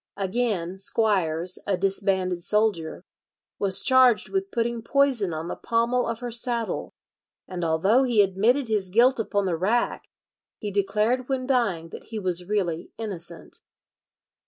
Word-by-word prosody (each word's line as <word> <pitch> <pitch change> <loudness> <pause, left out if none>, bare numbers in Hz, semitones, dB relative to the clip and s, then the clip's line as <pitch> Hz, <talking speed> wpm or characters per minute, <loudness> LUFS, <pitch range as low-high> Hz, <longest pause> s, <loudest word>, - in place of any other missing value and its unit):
Again, 195 -3 -2
Squires, 185 -5 +1
a 195 -2 +1
disbanded 190 -2 0
soldier, 200 -5 0 0.6
was 195 -1 +2
charged 255 -3 +4
with 390 0 -2
putting 235 -3 -2
poison 250 -6 +1
on 160 +1 -5
the - - -4
pommel 235 +2 0
of 230 0 -4
her 245 -1 -4
saddle, 235 -1 -1 0.5
and 180 -2 -5
although 170 +10 +3
he 240 -6 +4
admitted 220 +8 +1
his 210 -4 0
guilt 240 +6 +4
upon 205 -2 -1
the 180 -3 0
rack, 210 +8 0 0.5
he 210 - -5
declared 210 +6 0
when 260 -1 -1
dying 215 -11 0
that - - -10
he 225 - -7
was 180 -2 +1
really 175 -6 -1
innocent. 175 -6 -6
210 Hz, 140 wpm, -25 LUFS, 185-235 Hz, 0.6 s, charged